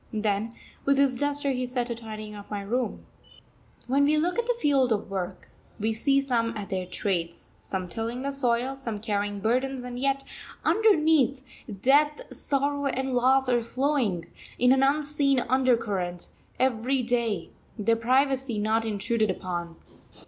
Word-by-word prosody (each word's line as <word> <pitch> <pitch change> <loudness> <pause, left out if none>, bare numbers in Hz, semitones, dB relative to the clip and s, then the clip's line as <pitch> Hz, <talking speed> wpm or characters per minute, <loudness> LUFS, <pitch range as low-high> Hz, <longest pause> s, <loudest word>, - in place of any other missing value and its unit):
Then, 215 +1 -1 0.3
with 275 0 +3
his 275 -2 +3
duster, 285 0 0
he 255 -1 -2
set 245 -1 -1
to 240 - -3
tidying 215 -2 -8
up 205 -1 -10
my 205 -1 -3
room. 240 +5 -2 0.8
When 275 +3 +2
we 305 +1 +3
look 350 +8 +1
at 475 - -1
the - - +1
field 275 - +3
of 205 -2 -1
work, 185 -2 -4 0.3
we 220 +2 0
see 275 +5 +2
some 230 -4 0
at 205 -2 -6
their 185 -1 -2
trades, 175 -3 -3
some 185 -1 -4
tilling 230 +6 -4
the 280 - -1
soil, 255 -1 +1
some 230 -6 -5
carrying 205 -2 -2
burdens, 255 +4 0
and 245 0 -6
yet 275 +1 0 0.4
underneath, 310 - +3 0.4
death, 295 +3 +4 0.2
sorrow, 285 0 -1
and 265 0 -1
loss 260 +2 +3
are 245 -1 +2
flowing, 235 - 0 0.3
in 250 +1 +4
an 265 0 +4
unseen 280 -1 +2
undercurrent, 230 -9 0 0.3
every 255 +1 +1
day, 230 -7 -1 0.3
their 230 +1 +2
privacy 260 +1 +1
not 220 +2 +1
intruded 220 +1 0
upon. 175 -2 -4
245 Hz, 155 wpm, -27 LUFS, 215-275 Hz, 0.8 s, death